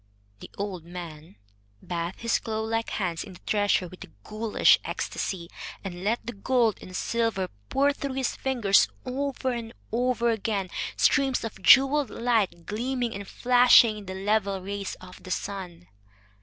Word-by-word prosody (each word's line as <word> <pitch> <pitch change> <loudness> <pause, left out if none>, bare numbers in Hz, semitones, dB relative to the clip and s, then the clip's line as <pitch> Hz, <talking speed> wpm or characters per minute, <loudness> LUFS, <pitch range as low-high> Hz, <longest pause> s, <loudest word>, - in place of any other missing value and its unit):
The - - -10
old 195 -4 -4
man 165 - -9 0.5
bathed 170 +1 -4
his 230 0 +1
claw 220 -1 -3
like 225 +1 -2
hands 175 -5 -2
in 190 - -11
the 180 - -14
treasure 205 -3 +2
with 180 +1 -11
a - - -12 0.2
ghoulish 215 0 +3
ecstasy, 175 -3 -4 0.4
and 180 -2 -6
let 220 +4 0
the 240 - -5
gold 230 +1 +1
and 185 - -10
silver 225 -4 -1 0.2
pour 280 +1 +3
through 280 -1 -4
his 265 -2 -1
fingers 235 -7 +3 0.2
over 260 0 -2
and 230 -1 -5 0.2
over 235 0 +1
again, 205 -4 -2 0.3
streams 275 -3 +3
of 220 -4 -6
jeweled 275 +6 +6
light 215 -8 0
gleaming 245 +2 -2
and 200 0 -7
flashing 245 -2 +5
in 205 - -11
the 190 - -5
level 200 0 0
rays 200 +1 -5
of 185 0 -12
the - - -11
sun. 180 -3 -5
215 Hz, 155 wpm, -26 LUFS, 185-240 Hz, 0.5 s, jeweled